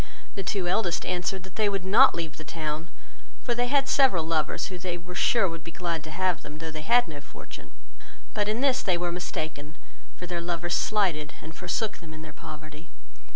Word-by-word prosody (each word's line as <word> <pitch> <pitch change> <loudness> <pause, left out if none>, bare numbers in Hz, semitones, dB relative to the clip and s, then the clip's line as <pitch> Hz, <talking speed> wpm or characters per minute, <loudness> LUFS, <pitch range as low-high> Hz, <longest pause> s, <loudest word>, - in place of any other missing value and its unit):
The 200 - -3
two 190 -1 -1
eldest 175 -2 +1
answered, 185 +1 -1
that 190 +1 -12
they 215 -2 +4
would 195 -2 -2
not 230 +8 +7
leave 160 -3 -3
the 155 - -7
town, 155 +1 -4 0.5
for 240 - +1
they 245 +1 +1
had 275 +1 +3
several 260 - +4
lovers, 160 -1 +1
who 185 -2 -5
they 175 -1 -2
were 180 +1 -9
sure 220 +2 +4
would 165 -2 -6
be - - -7
glad 170 -3 -2
to - - -7
have 180 +1 +1
them, 150 0 -8
though 160 0 -5
they 155 -1 -5
had 235 +5 +4
no 150 -3 -7
fortune; 145 - -11 0.6
but 205 -1 +1
in 220 +3 0
this 270 -2 +3
they 185 -3 +2
were 175 0 -1
mistaken, 155 -3 -4 0.4
for 180 - -6
their 175 -1 -2
lovers 175 0 -1
slighted 175 -8 +1
and 160 +1 -10
forsook 205 +4 -1
them 160 -2 -10
in 155 - -8
their 155 -1 -9
poverty. 155 +1 -10
175 Hz, 210 wpm, -28 LUFS, 160-195 Hz, 0.6 s, not